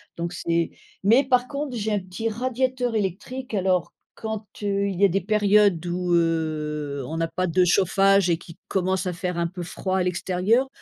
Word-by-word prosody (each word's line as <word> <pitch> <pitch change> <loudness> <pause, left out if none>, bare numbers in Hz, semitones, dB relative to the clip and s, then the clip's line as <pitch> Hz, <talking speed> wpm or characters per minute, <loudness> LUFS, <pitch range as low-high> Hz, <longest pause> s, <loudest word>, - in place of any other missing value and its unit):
donc 170 0 -3
c'est 170 -1 0 0.3
mais 235 +8 +5
par 250 -1 +3
contre 280 -2 -4
j'ai 220 -1 -2
un 205 - +1
petit 185 +5 -4
radiateur 250 +1 -1
électrique, 215 +6 -3
alors 185 -3 +1 0.2
quand, 220 -1 -5 0.2
heu, 200 0 +1
il 185 - -4
y 200 - +6
a - - +7
des 195 +1 0
périodes 205 -3 +3
où, 180 0 -1
heu, 150 -4 0
on 160 - -5
n'a 165 0 0
pas 185 0 -1
de 180 +2 +3
chauffage 195 +1 +4
et 165 - +2
qui 170 - -13
commence 190 0 0
à 180 - -1
faire 180 0 -3
un 170 - +1
peu 180 +1 -7
froid 185 +2 -2
à 185 - +2
l'extérieur, 185 +8 +1
190 Hz, 195 wpm, -24 LUFS, 170-215 Hz, 0.3 s, a